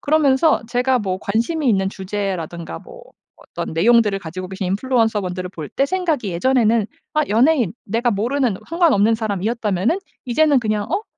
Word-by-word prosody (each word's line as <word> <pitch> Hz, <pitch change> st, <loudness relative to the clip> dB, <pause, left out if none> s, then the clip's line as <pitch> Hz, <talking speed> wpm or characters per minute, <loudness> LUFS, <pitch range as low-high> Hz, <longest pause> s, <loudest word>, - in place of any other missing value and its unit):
그러면서 295 Hz, -2 st, +3 dB
제가 250 Hz, +1 st, +1 dB
뭐 190 Hz, -2 st, -2 dB
관심이 250 Hz, +8 st, -1 dB
있는 195 Hz, -3 st, +2 dB
주제라든가 190 Hz, -4 st, -4 dB
뭐 -, -, -13 dB, 0.3 s
어떤 -, -, -7 dB
내용들을 210 Hz, +3 st, +3 dB
가지고 185 Hz, +2 st, -7 dB
계신 190 Hz, 0 st, -4 dB
인플루언서 225 Hz, +1 st, +1 dB
분들을 180 Hz, -1 st, -5 dB
볼 155 Hz, -5 st, -7 dB
때 275 Hz, -, 0 dB
생각이 320 Hz, -, -1 dB
예전에는 230 Hz, +2 st, +2 dB, 0.3 s
아 305 Hz, -, +3 dB
연예인 240 Hz, -, +3 dB
내가 230 Hz, +4 st, 0 dB
모르는 235 Hz, +1 st, 0 dB
상관없는 295 Hz, -, +3 dB
사람이었다면은 215 Hz, -, -1 dB, 0.3 s
이제는 285 Hz, +3 st, +3 dB
그냥 215 Hz, -3 st, -1 dB
'어? 390 Hz, +5 st, 0 dB
225 Hz, 385 characters per minute, -20 LUFS, 195-265 Hz, 0.3 s, 그러면서